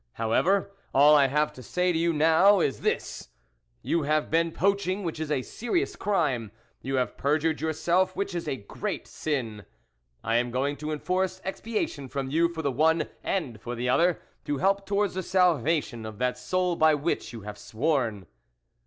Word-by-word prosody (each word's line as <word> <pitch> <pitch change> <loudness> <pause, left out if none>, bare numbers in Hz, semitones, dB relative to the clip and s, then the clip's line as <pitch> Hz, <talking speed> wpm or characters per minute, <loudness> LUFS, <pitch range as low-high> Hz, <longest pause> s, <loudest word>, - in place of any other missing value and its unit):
However, 180 - +1 0.2
all 145 +2 +7
I 140 -2 +5
have 150 +3 +1
now - - -20
to 130 - -11
say 180 +8 0
to 160 - 0
you 170 0 +2 0.5
is 135 - 0
this: - - -2 0.5
You 170 - +1
have 155 +1 0
been 165 +1 +2
poaching, 200 +1 0
which 165 -3 -4
is 160 -1 -3
a 135 -4 0
serious 350 - -2
crime; 145 - 0 0.3
you 135 +1 -2
have 125 -1 -1
perjured 155 +2 +1
yourself, 170 +4 +1
which 200 - -2
is 170 -1 -4
a - - -1
great 100 -6 -5
sin; 115 -9 -3 0.6
I 115 +1 +1
am 120 +1 0
going 135 +4 -1
to 155 +2 -4
enforce 185 +4 -1
expia 215 +3 -2
tion 140 -3 -9
from 135 -1 -4
you 165 +3 +3
for 160 -1 -6
the 140 - +1
one 160 +5 +2
and 135 - -2
for 120 +1 -5
the 125 +1 -2
other, 170 +6 +3 0.3
to 145 - -1
help 195 +4 +1
towards 200 0 +1
the 185 - -2
salvation 160 -10 +1
of 110 -1 -9
that 125 +2 0
soul 180 +8 -1
by 155 -1 +4
which 145 -6 -2
you 115 -2 -8
have 105 0 -8
sworn." 120 - -1
155 Hz, 185 wpm, -27 LUFS, 130-180 Hz, 0.6 s, all